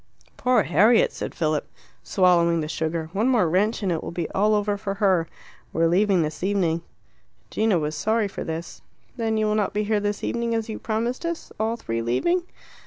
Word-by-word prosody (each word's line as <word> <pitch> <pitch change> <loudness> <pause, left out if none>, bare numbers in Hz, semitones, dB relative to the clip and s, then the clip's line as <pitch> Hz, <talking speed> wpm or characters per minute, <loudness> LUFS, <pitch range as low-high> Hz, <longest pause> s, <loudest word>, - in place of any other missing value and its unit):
"Poor 250 0 +2
Harriet!" 215 - +4
said - - -6
Philip, 155 -3 0 0.3
swallowing 170 -3 +3
the 150 - -3
sugar. 160 +1 -3
"One 215 +6 +1
more 235 -9 +3
wrench 205 +7 +1
and 190 - +1
it 165 - -1
will - - -8
all - - -7
be 170 -2 -3
over 210 0 +2
for 200 -1 -4
her; 190 -5 +2 0.5
we 165 - +1
are - - +5
leaving 185 0 +3
this 155 0 -5
evening." 180 -4 +1 0.7
Gino 215 -4 +2
was 150 -1 -2
sorry 220 +2 +1
for 195 - -6
this. 165 +2 -6 0.3
"Then 225 -2 -1
you 215 - +1
will 210 - +1
not 210 -2 0
be 210 - +1
here 210 0 +1
this 205 0 -2
evening 235 -1 -1
as 225 0 -2
you 215 - -5
promised 235 +5 -2
us. 335 -1 -4
All 220 +1 0
three 115 - -3
leaving?" 125 - +1
200 Hz, 200 wpm, -24 LUFS, 165-220 Hz, 0.7 s, are